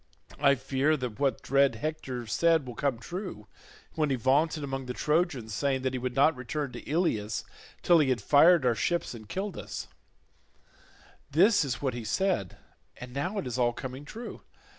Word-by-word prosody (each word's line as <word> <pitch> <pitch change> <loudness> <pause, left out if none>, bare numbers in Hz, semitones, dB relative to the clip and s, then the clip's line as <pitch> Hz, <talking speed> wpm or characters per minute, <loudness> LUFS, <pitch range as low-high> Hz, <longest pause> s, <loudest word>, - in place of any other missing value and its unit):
I 140 -1 +5
fear 140 +4 +1
that 125 -3 -5
what 135 -4 0
dread 140 -2 +3
Hector 130 -2 -4
said 165 +6 +2
will 125 - -7
come 135 -1 -1
true, 175 - -7 0.5
when 155 -2 0
he 135 - +2
vaunted 145 +5 +1
among 135 -2 -4
the 125 - -4
Trojans 150 -8 0
saying 135 +2 0
that 130 -1 0
he 130 - -2
would 125 0 -3
not 145 +3 +4
return 135 +2 -4
to - - -8
Ilius 115 - 0 0.4
till 175 -2 +6
he 145 -3 +3
had 125 -2 +1
fired 150 - +5
our 120 - +4
ships 170 - -1
and 110 -3 -11
killed 195 - -4
us; - - -6 1.4
this 195 +8 +4
is 130 -2 -3
what 130 -3 0
he 120 -1 -5
said, 175 - -1 0.4
and 125 0 -9
now 180 +10 -2
it 200 - -2
is 125 0 -3
all 120 -1 +3
coming 130 +3 -7
true. 225 +11 -8
135 Hz, 185 wpm, -29 LUFS, 125-155 Hz, 1.4 s, till